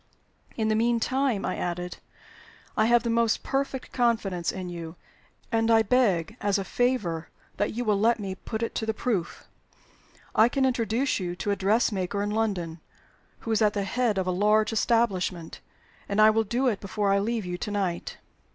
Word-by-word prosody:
"In 220 -2 0
the - - +3
mean 235 +1 +2
time," 260 -3 0
I - - -2
added, 180 0 -4 0.8
"I 215 0 +3
have 240 0 +4
the 235 - 0
most 230 -1 +1
perfect 270 -1 -2
confidence 210 -8 0
in 185 -1 -6
you; 170 -1 -7 0.6
and 225 0 +2
I 225 -1 +5
beg 215 -5 +2
as 205 -1 +2
a 195 - -2
favor 200 -9 -1 0.3
that 205 - 0
you 245 +1 -2
will 210 -2 +2
let 230 +2 +3
me 195 -2 -4
put 220 +4 -5
it 230 - -3
to 220 - -4
the 220 - 0
proof. 205 -8 -2 0.9
I 220 +2 +5
can 270 +1 +1
introduce 245 0 0
you 175 -2 -3
to 205 - -2
a - - +2
dressmaker 200 -1 +1
in 205 - -2
London 185 -7 -2 0.6
who 225 - -4
is 220 - +2
at 210 -1 +4
the 200 - -1
head 230 +1 0
of 190 - 0
a 185 - 0
large 210 +4 +2
establishment, 195 -7 0 0.5
and 200 +1 0
I 215 0 +8
will 225 0 +1
do 245 +6 0
it 220 -5 +1
before 200 0 -1
I 200 - +3
leave 220 0 -1
you 180 0 -4
to - - -4
night." 195 -4 -2
215 Hz, 190 wpm, -26 LUFS, 190-230 Hz, 0.9 s, I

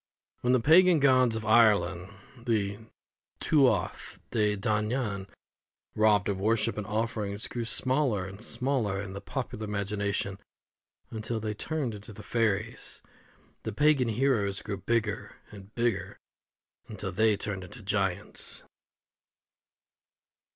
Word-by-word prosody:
When 125 +1 +2
the 130 - +5
pagan 170 +5 +6
gods 130 -4 +4
of 110 -1 -4
Ireland 100 -5 +4 0.3
the 110 -5 -1 0.6
Tuath 140 -5 +1
De 105 -2 +1
Danān 105 -1 -1 0.7
robbed 105 -2 +3
of 100 -2 -1
worship 110 +2 +1
and 105 -1 -4
offerings, 110 -1 -2
grew 120 -1 -4
smaller 130 -4 0
and 100 +2 -9
smaller 120 -5 -1
in 100 -1 -5
the 100 - -6
popular 125 -5 -4
imagination, 100 -1 -2 0.7
until 110 +1 -3
they 110 -1 -3
turned 140 +1 -3
into 105 +1 -9
the 105 - -11
fairies, 110 -1 -1 0.6
the 110 - -4
pagan 140 +2 +3
heroes 110 -4 +1
grew 100 -2 -4
bigger 110 +2 -1 0.2
and 100 0 -13
bigger, 115 -4 -1 0.7
until - - -5
they 110 +2 +3
turned 100 -2 -4
into 90 - -11
the 105 - -13
giants. 95 -3 -2
110 Hz, 125 wpm, -29 LUFS, 100-120 Hz, 0.7 s, pagan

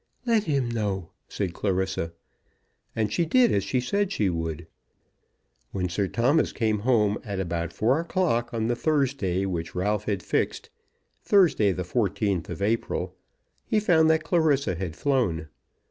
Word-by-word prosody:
"Let 230 -3 +2
him 140 -6 0
know," 100 -7 -3 0.2
said 95 -4 -3
Clarissa. 95 -3 -1 0.8
And 110 -1 -1
she 170 - +2
did 245 +10 +4
as 100 - +1
she 130 - 0
said 200 +10 0
she 100 - +1
would. 80 -1 -4 1.1
When 90 -2 -1
Sir 95 +4 -1
Thomas 130 - +2
came 110 -3 0
home 105 -3 +2
at 100 -3 -4
about 85 -2 -2
four 120 - +1
o'clock 165 -9 0
on 115 -1 -1
the 120 +1 +1
Thursday 130 - 0
which 85 -3 -4
Ralph 105 +3 0
had 100 -5 -2
fixed, - - -2 0.5
Thursday, 170 - +4
the 90 0 -3
fourteenth 100 -2 -1
of 85 +3 -4
April, 115 +3 -1 0.5
he 215 - +1
found 160 -6 +4
that 160 0 +3
Clarissa 155 - +2
had 85 -2 -5
flown. 100 - 0
105 Hz, 150 wpm, -26 LUFS, 95-140 Hz, 1.1 s, did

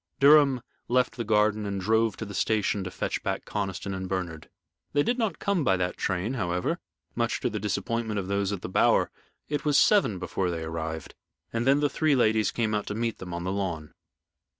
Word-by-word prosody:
Durham 140 -3 +6 0.2
left 125 +1 +2
the 120 - -3
garden 105 -1 +2
and 100 -1 -2
drove 110 +2 +2
to 115 - -5
the 100 - -8
station 105 0 +1
to - - -3
fetch - - -3
back - - -3
Conniston 100 -1 -3
and 95 -1 -4
Bernard. 90 -4 -4 0.4
They 145 - +3
did 245 +7 0
not 220 -4 0
come 200 -5 0
by 95 -7 +3
that 90 0 -1
train, 95 +5 -1
however, 90 - -1 0.3
much 115 -1 0
to - - 0
the 105 - -3
disappointment 110 +2 -2
of 95 - -4
those 100 0 0
at 100 -3 -4
the - - -3
Bower. 95 - +3 0.4
It 145 0 -2
was 150 -2 +3
seven 165 - +4
before 90 +1 -2
they 85 -2 -3
arrived, 80 -1 -5 0.4
and 115 +2 -1
then 140 +2 +4
the 145 - +4
three 155 +1 +2
ladies 110 -3 +3
came 110 -2 -1
out 105 -1 -1
to 105 - -3
meet 115 0 -2
them 90 -1 -7
on 85 0 -4
the 95 - -2
lawn. 90 -6 -3
105 Hz, 210 wpm, -27 LUFS, 95-120 Hz, 0.4 s, Durham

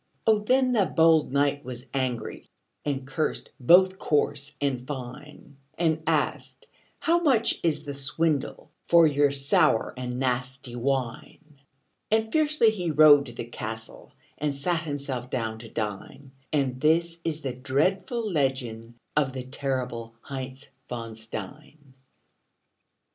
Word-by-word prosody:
Oh, 220 -1 +5
then 255 +4 +2
the 210 -7 +3
bold 160 -3 +4
knight 145 +1 +1
was 125 0 -7
angry, 130 -3 -3 0.3
And 140 -2 -2
cursed 150 +3 -2
both 185 +8 +5
coarse 145 -1 0
and 130 -3 -2
fine; 140 +1 -8 0.2
And 160 -2 +1
asked, - - -1 0.4
"How 340 +1 +3
much 255 -9 +3
is 155 -3 0
the 145 - -4
swindle 140 +2 -1 0.2
For 170 -1 +7
your 145 -1 +3
sour 140 - +2
and 125 -1 -4
nasty 125 0 -2
wine?" 135 +4 -3 0.5
And 220 0 +1
fiercely 300 -7 +3
he 180 -6 -3
rode 150 -2 +7
to 120 - -7
the 115 - -5
castle 110 -1 -7 0.3
And 145 -1 -1
sat 165 +4 0
himself 140 -5 -4
down 110 -3 -3
to 115 0 -10
dine; 110 +7 -5 0.2
And 130 -4 0
this 165 +2 +2
is 160 -1 -2
the 135 -3 -3
dreadful 185 - 0
legend 130 - -2 0.2
Of 140 -3 +1
the 130 -1 -5
terrible 125 -3 -4
Heinz 135 0 -7 0.2
von 115 -2 -5
Stein. 130 +7 -9
140 Hz, 130 wpm, -26 LUFS, 125-160 Hz, 0.5 s, For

